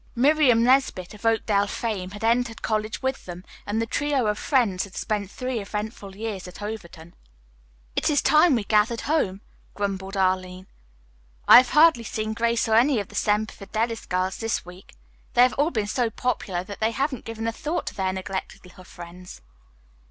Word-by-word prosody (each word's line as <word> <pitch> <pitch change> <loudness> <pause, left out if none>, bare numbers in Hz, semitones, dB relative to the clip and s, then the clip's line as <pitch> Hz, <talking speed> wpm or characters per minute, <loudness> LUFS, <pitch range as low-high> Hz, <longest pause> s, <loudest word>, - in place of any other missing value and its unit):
Miriam 260 -2 +4
Nesbit, 250 -8 +2
of 210 +2 -4
Oakdale 210 -2 +2
fame, 200 -4 -3
had 205 +3 -10
entered 235 0 0
college 215 0 -2
with 265 -5 -2
them, 175 +1 -8 0.2
and 210 +2 -1
the 230 - 0
trio 285 +1 0
of 210 0 0
friends 230 -10 +1
had 200 - -11
spent 205 -3 -2
three 255 +2 -4
eventful 210 -1 -6
years 205 -3 -5
at 180 - -11
Overton. 175 -6 -8 0.8
"It - - +1
is 290 -2 +3
time 305 -1 +5
we 225 - -1
gathered 215 +3 +2
home," 205 -11 0 0.3
grumbled 195 -1 -3
Arline. 185 -1 0 0.8
"I - - +11
have 250 0 +6
hardly 310 -6 +6
seen 215 -1 -3
Grace 235 +1 0
or 220 - +1
any 245 +2 +4
of 200 - -5
the - - -15
Semper 210 +1 0
Fidelis 225 +3 -3
girls 185 +1 -1
this 225 -5 -2
week. 180 +2 -14 0.4
They 245 - +7
have 250 - +3
all 290 +3 +1
been 215 -10 -1
so 235 +3 0
popular 210 -6 -2
that 200 +2 -9
they 220 - +2
haven't 270 +2 -2
given 225 0 -5
a 230 - 0
thought 305 +8 -3
to - - -5
their 190 -1 -1
neglected 190 0 -6
little 180 0 -15
friends." 175 - -11
215 Hz, 180 wpm, -24 LUFS, 190-240 Hz, 0.8 s, I